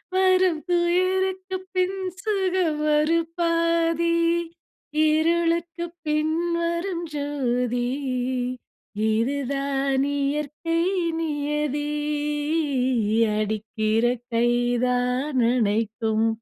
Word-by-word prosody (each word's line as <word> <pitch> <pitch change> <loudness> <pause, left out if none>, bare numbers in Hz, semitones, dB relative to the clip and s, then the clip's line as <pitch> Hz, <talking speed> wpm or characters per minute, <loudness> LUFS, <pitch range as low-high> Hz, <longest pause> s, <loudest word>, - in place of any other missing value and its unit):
வரும் 370 -3 +3
புயலுக்கு 370 +2 +1 0.2
பின் 370 +1 +1 0.2
சுகம் 370 -7 0
ஒரு 310 +3 +3 0.2
பாதி. 335 0 +2 0.9
இருளுக்கு 335 +2 +1 0.2
பின்வரும் 335 +3 -1
ஜோதி. 250 -4 -1 1.2
இது 230 +6 +1 0.2
தான் 275 -1 0
இயற்கை 300 +4 -1 0.4
நியதி. 295 -2 -1 1.5
அடிக்கிற 215 +1 0 0.3
கை 230 +1 +3 0.4
தான் 250 +3 0
அணைக்கும். 220 -1 +1
305 Hz, 60 wpm, -24 LUFS, 255-340 Hz, 1.5 s, வரும்